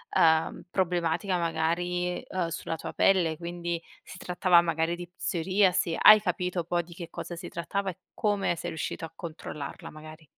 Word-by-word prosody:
uhm, 160 0 +3
problematica 180 0 0
magari, 175 +2 -1
uhm, 185 -2 -1
sulla 165 0 -4
tua 160 - -7
pelle, 170 -5 +3
quindi 170 0 -4 0.2
si 185 - -11
trattava 180 -1 +4
magari 165 0 0
di 175 0 -8
psoriasi, 180 -1 +1
hai 215 0 +10
capito 180 -2 -1
poi 175 +1 0
di 170 +1 -13
che 170 -2 -7
cosa 175 - -6
si 175 +1 -7
trattava 195 +3 -2
e 170 - -16 0.2
come 205 -4 0
sei - - -4
riuscito 160 +1 -4
a - - -11
controllarla 155 -3 -7
magari? 155 +1 -12
175 Hz, 160 wpm, -28 LUFS, 165-180 Hz, 0.2 s, hai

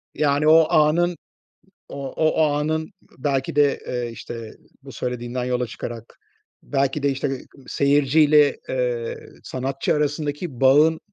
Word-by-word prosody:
Yani, 145 0 +1
o 160 0 +6
anın, 165 +3 +3 0.7
o 140 -1 -6
o 155 0 +2
anın 155 +4 -1 0.3
belki 135 0 -1
de, 145 -1 +3
eee, 120 -1 -3
işte, 115 -1 -8 0.3
bu 135 - -10
söylediğinden 125 +1 -4
yola 125 -1 -1
çıkarak 115 -1 -8 0.5
belki 140 +1 -1
de, 140 - +2
işte, 135 +2 -2
ııı, 135 -1 -3 0.3
seyirciyle, 145 +1 +3
eee, 125 -2 -2 0.3
sanatçı 135 +3 -2
arasındaki 150 -1 -3
bağın, 150 +5 +5
140 Hz, 125 wpm, -22 LUFS, 125-150 Hz, 0.7 s, o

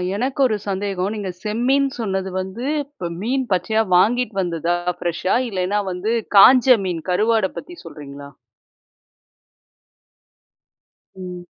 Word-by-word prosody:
எனக்கு 260 +6 -3
1 230 -4 +1
சந்தேகம். 195 -1 -2
நீங்க 200 -3 -4
செம்மீன் 245 +7 +1
சொன்னது 190 -4 -2
வந்து, 190 +7 -5 0.2
இப்போ 280 -11 -7
மீன் 260 +5 0
பச்சையா 205 +5 +1
வாங்கிட்டு 225 +4 +2
வந்ததா 170 -1 -1 0.2
ஃப்ரெஷ்ஷா, 175 +2 -1
இல்லயின்னா 195 +1 -1
வந்து 185 +5 -2 0.2
காஞ்ச 255 +3 +7
மீன் 170 -3 -3
கருவாட 215 +2 +2
பத்தி 350 +4 -8
சொல்றீங்களா? 140 -1 -10 2.9
ம். 180 -1 -8
200 Hz, 110 wpm, -20 LUFS, 180-235 Hz, 2.9 s, காஞ்ச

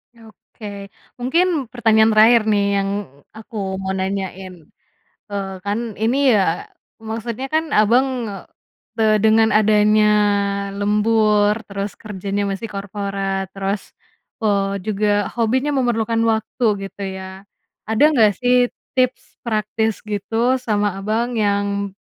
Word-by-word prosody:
Oke. 210 -2 -11 0.3
Mungkin 315 +2 +1
pertanyaan 225 -2 +3
terakhir 225 +2 +6
nih 205 -1 +2 0.2
yang 195 0 -1 0.5
aku 220 +1 -12 0.3
mau 190 0 -3
nanyain. 190 -1 -4 0.8
Eee, 200 -1 -3
kan 205 +1 -1 0.2
ini 230 +4 +2 0.2
ya, 180 -4 0 0.3
maksudnya 225 +3 -5
kan 320 +1 +2
Abang, 230 +5 +4 0.9
te - - +2 0.2
dengan 220 0 +5
adanya 210 0 +4 0.7
lembur, 210 0 +2
terus 200 0 -4
kerjanya 200 -1 -4
masih 195 +4 -4
korporat, 195 -1 -3
terus, 195 +1 -2 0.6
eee, 200 -2 +1
juga 210 0 0 0.3
hobinya 255 +5 +1
memerlukan 230 -2 0
waktu, 220 +3 -2 0.3
gitu 200 - -10
ya, 190 +1 -10 0.4
ada 220 +3 +1
nggak 220 -6 +4
sih 245 0 +3 0.4
tips 255 0 -1
praktis 220 0 -1
gitu 225 +5 0
sama 210 -4 0
Abang 225 +4 -1
yang 200 -1 0
215 Hz, 110 wpm, -20 LUFS, 200-225 Hz, 0.9 s, terakhir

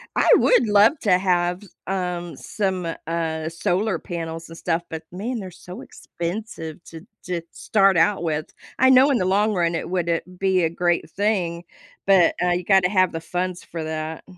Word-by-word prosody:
I - - +2
would - - +4
love 210 +8 +5
to 190 -5 +4
have, 180 -1 0 0.3
um, 180 -2 -3
some, 190 -4 -2 0.2
uh, 160 -1 -2
solar 185 +5 -1
panels 165 -1 -6
and 165 - -10
stuff, 170 -1 -1
but 160 0 -6
man, 225 +7 -4
they're 190 -3 -7
so 180 +6 -11
expensive 170 - -6
to 165 +2 -11 0.2
to 175 -2 -3
start 195 -3 +2
out 175 +3 +2
with. 155 -2 -1 0.3
I 260 - +5
know 260 +2 +6
in 265 - +2
the 185 - 0
long 205 +3 +2
run 170 -3 0
it 165 - -4
woulda 170 -2 0 0.2
be 190 -2 +2
a 165 - +2
great 175 +1 0
thing, 185 -5 -1 0.4
but 190 -3 +5
uh 180 0 +2
you 175 +1 0
gotta 190 -1 +4
have 185 -2 +3
the 165 - -4
funds 180 +2 -3
for 165 -1 -6
that. 155 0 -5
180 Hz, 180 wpm, -22 LUFS, 165-195 Hz, 0.4 s, know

